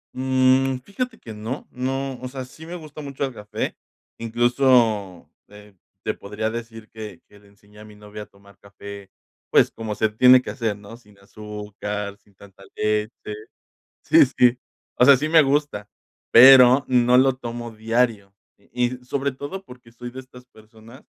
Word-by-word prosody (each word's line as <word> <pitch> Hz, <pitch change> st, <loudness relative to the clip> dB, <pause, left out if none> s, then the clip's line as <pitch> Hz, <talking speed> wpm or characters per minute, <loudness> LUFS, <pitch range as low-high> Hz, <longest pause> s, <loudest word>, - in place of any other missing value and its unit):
Mm. 130 Hz, 0 st, +2 dB
Fíjate 250 Hz, +4 st, -5 dB
que 115 Hz, -, -10 dB
no, 110 Hz, +6 st, -6 dB
no. 135 Hz, +1 st, -4 dB
O 130 Hz, -, -5 dB
sea, 130 Hz, 0 st, -7 dB
sí 155 Hz, +5 st, -14 dB
me 175 Hz, -, -7 dB
gusta 155 Hz, -3 st, -10 dB
mucho 140 Hz, -1 st, -4 dB
el 135 Hz, -, -6 dB
café, 105 Hz, -2 st, -5 dB, 0.4 s
incluso, 115 Hz, -5 st, +1 dB, 0.2 s
eh, 105 Hz, -1 st, -16 dB, 0.3 s
te -, -, -1 dB
podría 105 Hz, +2 st, -5 dB
decir 115 Hz, -1 st, -8 dB
que 105 Hz, -6 st, -10 dB
que 105 Hz, -, -20 dB
le 100 Hz, -, -23 dB
enseñé 100 Hz, +1 st, -21 dB
a 105 Hz, -, -12 dB
mi 105 Hz, -, -15 dB
novia 105 Hz, 0 st, -10 dB
a -, -, -13 dB
tomar 100 Hz, 0 st, -22 dB
café, 100 Hz, 0 st, -11 dB, 0.4 s
pues, -, -, +4 dB
como 110 Hz, -2 st, -6 dB
se 110 Hz, 0 st, +1 dB
tiene 125 Hz, +4 st, +6 dB
que -, -, -7 dB
hacer, 110 Hz, -4 st, -3 dB
¿no?, 105 Hz, +3 st, -12 dB
sin 105 Hz, -4 st, -23 dB
azúcar, 105 Hz, 0 st, -7 dB
sin 100 Hz, -1 st, -30 dB
tanta 100 Hz, -1 st, -17 dB
leche. 105 Hz, 0 st, 0 dB, 0.9 s
Sí, -, -, +6 dB
sí, 125 Hz, 0 st, +4 dB, 0.4 s
o 125 Hz, -, +5 dB
sea, 140 Hz, -, +8 dB
sí, 150 Hz, +4 st, -2 dB
me 160 Hz, -1 st, +6 dB
gusta, 140 Hz, -7 st, -1 dB, 0.4 s
pero 130 Hz, +1 st, +8 dB
no 125 Hz, 0 st, +4 dB
lo 130 Hz, 0 st, +4 dB
tomo 120 Hz, -1 st, -7 dB
diario. 110 Hz, -2 st, -1 dB, 0.2 s
Y 120 Hz, +4 st, -2 dB, 0.2 s
sobre 140 Hz, +1 st, -2 dB
todo, 145 Hz, +9 st, -8 dB
porque 125 Hz, -6 st, -16 dB
soy 120 Hz, +1 st, -9 dB
de 130 Hz, -, -9 dB
estas 125 Hz, -1 st, -14 dB
personas 110 Hz, +2 st, -18 dB
115 Hz, 170 wpm, -22 LUFS, 105-130 Hz, 0.9 s, sea